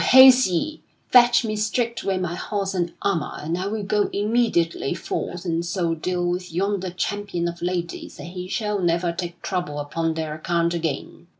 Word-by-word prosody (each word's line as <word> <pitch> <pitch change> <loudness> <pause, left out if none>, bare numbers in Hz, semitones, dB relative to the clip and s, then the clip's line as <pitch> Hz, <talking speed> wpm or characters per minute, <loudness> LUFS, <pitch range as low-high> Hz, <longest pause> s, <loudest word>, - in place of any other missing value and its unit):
Haste 260 -2 +8
ye! 290 - -2 0.3
Fetch 240 -1 +6
me 215 -1 -1
straightway 215 -2 0
my 180 -2 -2
horse 195 +2 -2
and 175 -2 -1
armor 170 -7 0
and 160 +3 -3
I 185 +2 -2
will 215 0 -2
go 205 +1 +1
immediately 205 - +1
forth 175 +1 -4
and 165 -1 0
so 170 -1 0
deal 175 +2 -1
with 180 0 -2
yonder 190 +2 -1
champion 185 -1 -2
of 170 0 -6
ladies 175 -1 -3
that - - -8
he 180 +1 -6
shall 210 +1 -1
never 170 -1 +1
take 175 0 -6
trouble 175 -6 -2
upon 160 +3 -2
their 160 -1 -3
account 170 +2 0
again." 165 -3 -4
180 Hz, 175 wpm, -23 LUFS, 170-205 Hz, 0.3 s, Haste